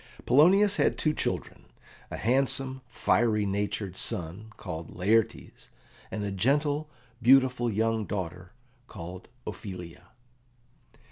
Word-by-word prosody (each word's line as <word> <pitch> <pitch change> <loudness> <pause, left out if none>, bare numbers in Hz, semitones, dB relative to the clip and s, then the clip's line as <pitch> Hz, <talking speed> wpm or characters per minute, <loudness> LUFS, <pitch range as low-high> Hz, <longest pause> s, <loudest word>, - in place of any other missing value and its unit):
Polonius 195 +9 +5
had - - +2
two 155 - +1
children - - -3 0.4
a - - -5
handsome, 130 +2 0
fiery 115 -3 +2
natured 100 -1 -2
son 95 +6 -4
called 80 +1 -7
Laertes, 110 +4 0 0.4
and 105 - -4
a 100 - -2
gentle, 145 +9 +1 0.3
beautiful 130 -1 +5
young 110 +1 0
daughter 90 -2 -5 0.4
called 90 +2 -9 0.2
Ophelia. 90 -5 -8
110 Hz, 105 wpm, -28 LUFS, 95-130 Hz, 0.4 s, Polonius